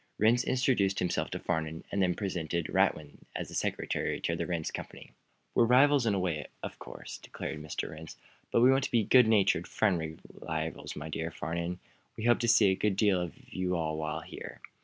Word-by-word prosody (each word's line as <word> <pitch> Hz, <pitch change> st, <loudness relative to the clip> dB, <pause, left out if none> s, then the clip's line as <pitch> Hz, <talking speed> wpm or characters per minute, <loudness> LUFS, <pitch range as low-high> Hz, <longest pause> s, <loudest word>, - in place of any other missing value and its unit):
Rhinds 115 Hz, +3 st, +4 dB
introduced 120 Hz, -7 st, +2 dB
himself 90 Hz, -1 st, 0 dB
to -, -, -4 dB
Farnum, 80 Hz, -1 st, -2 dB
then 95 Hz, -3 st, +1 dB
presented 85 Hz, -4 st, -2 dB
Radwin 75 Hz, -2 st, +1 dB, 0.2 s
as -, -, -5 dB
secretary -, -, -1 dB
to -, -, 0 dB
the -, -, -3 dB
Rhinds 85 Hz, -3 st, -2 dB
Company. -, -, -8 dB, 0.4 s
"We're 120 Hz, -, +5 dB
rivals 130 Hz, +1 st, +5 dB
in 105 Hz, -, +2 dB
a -, -, 0 dB
way, 80 Hz, -6 st, -2 dB, 0.2 s
of -, -, -6 dB
course," -, -, -9 dB
declared 75 Hz, -, -6 dB
Mr. 75 Hz, -1 st, -4 dB
Rhinds. 80 Hz, +1 st, -10 dB, 0.3 s
"But 115 Hz, -, +3 dB
we 125 Hz, +2 st, +7 dB
want 135 Hz, 0 st, +3 dB
to -, -, -5 dB
be 115 Hz, -2 st, +3 dB
good 125 Hz, +2 st, +6 dB
natured, 105 Hz, -3 st, +3 dB
friendly 80 Hz, -6 st, 0 dB, 0.2 s
rivals, 80 Hz, 0 st, -4 dB
my 75 Hz, +1 st, -6 dB
dear 80 Hz, +1 st, -3 dB
Farnum. 85 Hz, +3 st, -4 dB, 0.4 s
We 110 Hz, -, -5 dB
hope 120 Hz, 0 st, +4 dB
to 120 Hz, -, 0 dB
see 110 Hz, -4 st, +6 dB
a -, -, +1 dB
good 105 Hz, 0 st, 0 dB
deal 100 Hz, -3 st, +3 dB
of 90 Hz, -2 st, -5 dB, 0.2 s
you 90 Hz, -1 st, -1 dB
all 80 Hz, -2 st, -1 dB
while 80 Hz, +1 st, -3 dB
here." -, -, -9 dB
90 Hz, 195 wpm, -30 LUFS, 80-110 Hz, 0.4 s, we